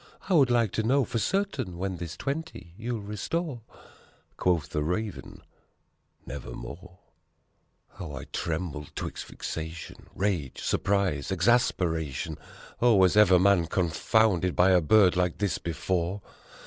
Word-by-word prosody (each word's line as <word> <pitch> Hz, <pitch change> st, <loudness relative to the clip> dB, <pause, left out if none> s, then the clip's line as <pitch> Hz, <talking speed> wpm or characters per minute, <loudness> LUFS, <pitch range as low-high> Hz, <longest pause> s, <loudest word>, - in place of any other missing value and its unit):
I 195 Hz, -, +1 dB
would 140 Hz, -7 st, +5 dB
like 120 Hz, -4 st, +2 dB
to -, -, 0 dB
know 130 Hz, +4 st, +2 dB
for 115 Hz, -, -2 dB
certain 135 Hz, -, -1 dB
when 95 Hz, 0 st, -3 dB
this 85 Hz, 0 st, -6 dB
twenty 140 Hz, -, -5 dB
you'll 115 Hz, +1 st, -4 dB
restore?" 120 Hz, -, -3 dB, 0.7 s
Quoth 85 Hz, -5 st, +1 dB
the 75 Hz, -, -2 dB
Raven, 90 Hz, +6 st, -4 dB, 0.8 s
"Nevermore 90 Hz, +6 st, -8 dB, 0.5 s
!" -, -, -40 dB
How 80 Hz, -5 st, -7 dB
I 65 Hz, -, -6 dB
trembled 80 Hz, -3 st, -4 dB
'twixt -, -, -5 dB
vexation 80 Hz, +1 st, -7 dB
rage 90 Hz, -9 st, -1 dB
surprise 95 Hz, -8 st, 0 dB
exasperation! 80 Hz, -, +1 dB, 0.4 s
Oh, 120 Hz, -2 st, +5 dB
was 95 Hz, -1 st, +4 dB
ever 100 Hz, -4 st, +7 dB
man 95 Hz, -2 st, +4 dB
confounded 90 Hz, +2 st, +1 dB
by 95 Hz, +2 st, +5 dB
a 90 Hz, -1 st, +5 dB
bird 95 Hz, +3 st, +5 dB
like 90 Hz, -2 st, 0 dB
this 100 Hz, -3 st, -1 dB
before? 90 Hz, +3 st, -2 dB
95 Hz, 130 wpm, -27 LUFS, 85-110 Hz, 0.8 s, ever